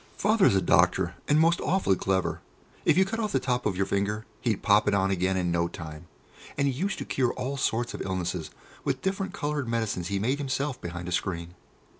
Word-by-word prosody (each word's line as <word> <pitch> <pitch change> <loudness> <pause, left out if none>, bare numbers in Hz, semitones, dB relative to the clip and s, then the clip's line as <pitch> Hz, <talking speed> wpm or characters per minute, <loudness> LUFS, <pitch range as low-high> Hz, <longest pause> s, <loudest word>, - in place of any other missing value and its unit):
Father 210 0 +3
is - - +3
a 95 - +2
doctor, 85 +1 +3
and 150 +1 +4
most 165 +2 +4
awfully 180 - +2
clever. 95 0 -1 0.4
If 150 - +4
you 190 - +6
cut 225 +4 -3
off 215 -2 -1
the 135 - +3
top 125 -2 0
of 95 -3 -2
your 95 - +2
finger, 105 +3 -1
he'd 115 -5 -1
pop 105 +1 +4
it 100 - +3
on 95 0 +2
again 95 0 +1
in 90 -1 0
no 85 0 +1
time, 80 -1 -9 0.5
and 140 0 +2
he 135 - +1
used 190 +9 -2
to - - -5
cure 125 -3 0
all 135 +2 -3
sorts 120 -2 0
of - - -5
illnesses 90 -3 -2 0.3
with 135 -2 -2
different 195 0 -1
coloured 145 -3 -2
medicines 110 -7 -1
he 100 - -1
made 125 +8 0
himself 135 -1 -2
behind 85 0 -5
a - - -4
screen. 85 -1 -2
105 Hz, 220 wpm, -27 LUFS, 90-140 Hz, 0.5 s, you